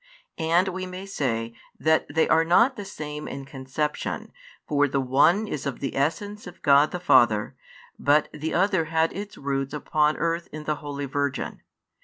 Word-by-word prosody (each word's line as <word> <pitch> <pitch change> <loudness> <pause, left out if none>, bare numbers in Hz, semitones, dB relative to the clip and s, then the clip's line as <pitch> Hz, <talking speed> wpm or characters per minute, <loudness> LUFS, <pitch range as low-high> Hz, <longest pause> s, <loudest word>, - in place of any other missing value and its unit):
And 170 +4 +2
[we 185 0 -4
may 185 +1 -7
say] 115 -11 -2 0.3
that 160 0 +2
they 160 +2 +2
are 160 0 +4
not 230 +11 +4
the 205 - -7
same 150 -4 -6
in 135 0 -6
conception, 135 +2 -4 0.3
for 145 -1 +3
the 140 0 0
one 145 +11 +3
is 150 -7 -4
of 135 - -4
the 135 - -4
Essence 205 +9 -2
of 180 - -12
God 145 +1 +5
the 180 - -4
Father, 110 -11 +3 0.4
but 145 +1 +3
the 155 +1 -4
other 190 -2 +2
had 160 +1 +1
its 205 +1 -7
root 135 0 -2
upon 150 0 +1
earth 170 +1 -1
in 155 0 -7
the 150 0 -1
holy 145 -1 -5
Virgin. 140 0 -2
150 Hz, 175 wpm, -25 LUFS, 140-175 Hz, 0.4 s, God